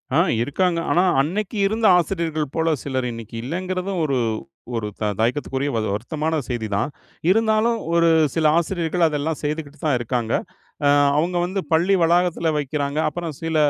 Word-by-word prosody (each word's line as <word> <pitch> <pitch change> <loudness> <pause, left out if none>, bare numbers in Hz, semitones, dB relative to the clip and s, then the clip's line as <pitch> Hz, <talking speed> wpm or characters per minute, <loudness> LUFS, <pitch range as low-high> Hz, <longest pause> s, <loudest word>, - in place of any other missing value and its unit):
ஆ - - +4 0.3
இருக்காங்க, 170 +6 0
ஆனா 175 - +4 0.2
அன்னைக்கு 200 +8 -2
இருந்த 220 +2 -1
ஆசிரியர்கள் 165 -4 -1
போல 165 0 +1
சிலர் 130 -2 -2
இன்னைக்கு 115 0 -9
இல்லைங்கிறதும், 185 +5 -3
ஒரு, 140 -3 0 0.6
ஒரு 110 -2 -2
த - - 0 0.2
தயக்கத்துக்குரிய 135 +3 0
வ - - +1
வருத்தமான 155 +8 -2
செய்திதான். 110 -1 -1 0.4
இருந்தாலும் 225 +2 +2 0.2
ஒரு 170 0 +4 0.3
சில 160 - +1
ஆசிரியர்கள் 170 0 +1
அதெல்லாம் 150 0 -2
செய்துக்கிட்டு 150 0 -4
தான் 140 -5 +3
இருக்காங்க. 120 -1 -2 0.5
அ - - +5 0.3
அவுங்க 175 +3 +1
வந்து 190 +2 -2
பள்ளி 180 +5 +4
வளாகத்தில 170 -1 +2
வைக்கிறாங்க. 145 +1 -2
அப்புறம் 170 -3 -5
சில 165 0 -2
160 Hz, 145 wpm, -22 LUFS, 140-180 Hz, 0.6 s, அ